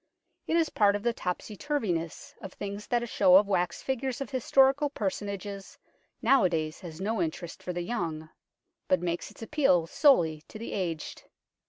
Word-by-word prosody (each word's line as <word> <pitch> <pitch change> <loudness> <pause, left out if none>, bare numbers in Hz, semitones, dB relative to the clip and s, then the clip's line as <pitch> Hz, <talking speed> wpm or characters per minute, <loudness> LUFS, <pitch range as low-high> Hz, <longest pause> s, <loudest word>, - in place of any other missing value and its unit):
It 325 - +1
is 330 -2 +2
part 205 -1 +3
of 205 - -4
the 235 0 +1
topsy 180 +2 -4
turviness 195 - -3
of 190 - -8
things 205 +1 -6
that 240 -1 +1
a - - -2
show 190 -5 +4
of 200 +2 +7
wax 180 -3 0
figures 265 -1 -2
of 275 - -5
historical 270 +2 +3
personages 200 -3 -4 0.5
nowadays 170 -11 +2
has 170 -4 -9
no 215 +4 -1
interest 165 +1 -4
for 180 - -4
the 175 0 -3
young, 165 -6 -4 0.6
but 185 - +3
makes 175 0 -3
its - - -12
appeal 225 - +3
solely 175 - +3
to - - -10
the 230 - -6
aged. 170 -5 -4
200 Hz, 170 wpm, -29 LUFS, 175-240 Hz, 0.6 s, of